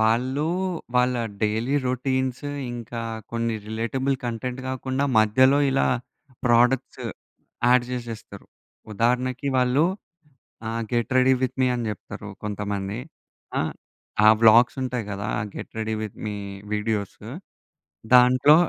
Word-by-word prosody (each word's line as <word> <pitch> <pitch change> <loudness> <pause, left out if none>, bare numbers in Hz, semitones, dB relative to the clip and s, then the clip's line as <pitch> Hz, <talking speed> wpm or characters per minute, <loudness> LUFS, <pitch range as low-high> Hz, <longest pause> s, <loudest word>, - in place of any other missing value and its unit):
వాళ్ళు, 125 +7 +2 0.5
వాళ్ళ 125 0 +3 0.3
daily 110 +6 +1
routines 130 +1 -1 0.3
ఇంకా, 120 0 -6 0.3
కొన్ని 115 -1 0
రిలేటబుల్ 125 +5 -1
కంటెంట్ 120 +2 -3
కాకుండా, 130 +1 -1
మధ్యలో 130 +6 +5
ఇలా 135 - +2 0.6
ప్రోడక్ట్‌స్ 120 +2 +3 0.7
యాడ్ 125 0 +5
చేసేస్తారు. 115 -5 -7 0.5
ఉదాహరణకి 125 +5 0
వాళ్ళు 125 +4 +3 0.8
ఆహ్, 115 +1 -2
"గెట్ 120 -2 0
రెడీ 130 +1 +5
విత్ 130 - -1
మీ" 130 - +4
అని 120 -2 -2
చెప్తారు 105 0 -7
కొంతమంది. 105 0 -3 0.6
ఆ! - - +2 0.6
ఆహ్, 110 +1 +8
వ్లాగ్స్ 115 +3 +6
ఉంటాయి 125 -3 -2
కదా! 100 0 -4 0.3
Get - - -7
ready 110 0 -1
with 110 -2 -5
me 105 -1 -3 0.4
videos! 105 -1 -2 0.9
దాంట్లో 125 +4 +7
120 Hz, 110 wpm, -24 LUFS, 110-130 Hz, 0.9 s, ఆహ్